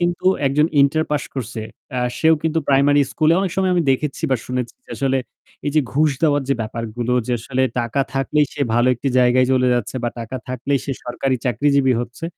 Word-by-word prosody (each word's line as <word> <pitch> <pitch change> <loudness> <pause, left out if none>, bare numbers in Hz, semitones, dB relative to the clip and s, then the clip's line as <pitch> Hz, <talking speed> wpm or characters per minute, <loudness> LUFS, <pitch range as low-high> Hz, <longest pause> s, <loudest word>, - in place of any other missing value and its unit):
কিন্তু 175 +1 -1 0.2
একজন 150 +3 +3
ইন্টার 155 +3 +3
পাশ 150 - 0
করছে 115 -4 -5 0.4
আ - - 0 0.2
সেও 160 0 +5
কিন্তু 160 0 0
প্রাইমারি 140 +1 +4
স্কুলে 155 0 +3
অনেক 195 - -1
সময় 190 -1 +2
আমি 175 - +2
দেখেছি 145 +3 -1
বা 130 - +3
শুনেছি 125 -1 -3
যে - - -20
আসলে 135 -1 +1 0.5
এই 145 - +1
যে 155 - +5
ঘুষ 150 +2 +3
দেওয়ার 145 -3 +3
যে 140 - +3
ব্যাপারগুলো 115 +2 -4
যে 125 - -1
আসলে 130 +2 -1 0.2
টাকা 120 +4 -1
থাকলেই 145 +3 +1
সে - - -7
ভালো 120 +1 +3
একটি 135 +3 -3
জায়গায় 125 +1 +4
চলে 130 -1 +3
যাচ্ছে 120 +1 -2
বা - - +2
টাকা 115 +3 -5
থাকলেই 130 +2 -1
সে 140 - -2
সরকারি 130 +2 -1
চাকরিজীবী 135 +2 +2
হচ্ছে। 120 +6 -7
135 Hz, 200 wpm, -20 LUFS, 125-150 Hz, 0.5 s, সেও